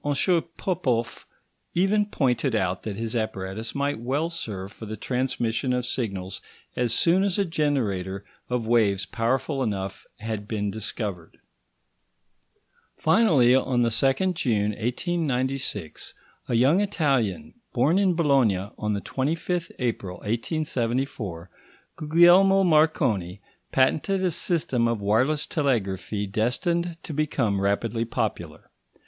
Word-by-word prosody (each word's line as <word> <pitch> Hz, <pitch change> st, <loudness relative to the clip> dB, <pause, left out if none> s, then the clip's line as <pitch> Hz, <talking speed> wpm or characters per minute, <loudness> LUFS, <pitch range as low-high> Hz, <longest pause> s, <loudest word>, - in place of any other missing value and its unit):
Popoff 125 Hz, -, -1 dB, 0.5 s
even 205 Hz, +4 st, +2 dB
pointed 130 Hz, -, 0 dB
out 95 Hz, -3 st, 0 dB
that 105 Hz, -3 st, -5 dB
his 115 Hz, +2 st, -4 dB
apparatus 110 Hz, -1 st, -3 dB
might 140 Hz, -2 st, -1 dB
well 140 Hz, +8 st, -1 dB
serve 100 Hz, -, -5 dB
for 115 Hz, -1 st, -10 dB
the 110 Hz, +1 st, -5 dB
transmission 125 Hz, -1 st, -1 dB
of 125 Hz, -1 st, -1 dB
signals 100 Hz, -7 st, -3 dB, 0.3 s
as 120 Hz, -2 st, 0 dB
soon 175 Hz, +10 st, +3 dB
as 200 Hz, -1 st, 0 dB
a 200 Hz, -, +2 dB
generator 105 Hz, -, -1 dB, 0.2 s
of 125 Hz, -2 st, -1 dB
waves 105 Hz, -4 st, +2 dB
powerful 130 Hz, +4 st, -1 dB
enough 100 Hz, -5 st, -3 dB
had 110 Hz, -1 st, -5 dB
been 105 Hz, -2 st, -2 dB
discovered. 100 Hz, -4 st, -4 dB, 1.6 s
Finally, 160 Hz, -, +4 dB
on 130 Hz, -2 st, +2 dB
the 115 Hz, -, +2 dB
2nd 135 Hz, +10 st, +2 dB
June 105 Hz, -10 st, 0 dB
1896, 130 Hz, -, -2 dB, 0.3 s
a 120 Hz, -, 0 dB
young 135 Hz, -, +4 dB
Italian, 155 Hz, -, 0 dB, 0.2 s
born 145 Hz, +10 st, +3 dB
in 190 Hz, -3 st, +2 dB
Bologna 125 Hz, -, +2 dB
on 105 Hz, 0 st, -1 dB
the 100 Hz, -, -2 dB
25th 165 Hz, -, -2 dB
April 110 Hz, -7 st, -2 dB
1874, 115 Hz, -, -2 dB, 0.5 s
Guglielmo 175 Hz, +5 st, +5 dB
Marconi, 135 Hz, -, +2 dB, 0.3 s
patented 155 Hz, +9 st, +2 dB
a 180 Hz, -, +2 dB
system 140 Hz, -8 st, 0 dB
of 115 Hz, -2 st, -1 dB
wireless 125 Hz, +9 st, +1 dB
telegraphy 105 Hz, -, -1 dB
destined 165 Hz, -, -1 dB
to 155 Hz, -, -6 dB
become 130 Hz, -9 st, 0 dB
rapidly 115 Hz, +4 st, 0 dB
popular. 110 Hz, -9 st, -4 dB
125 Hz, 120 wpm, -25 LUFS, 105-155 Hz, 1.6 s, Guglielmo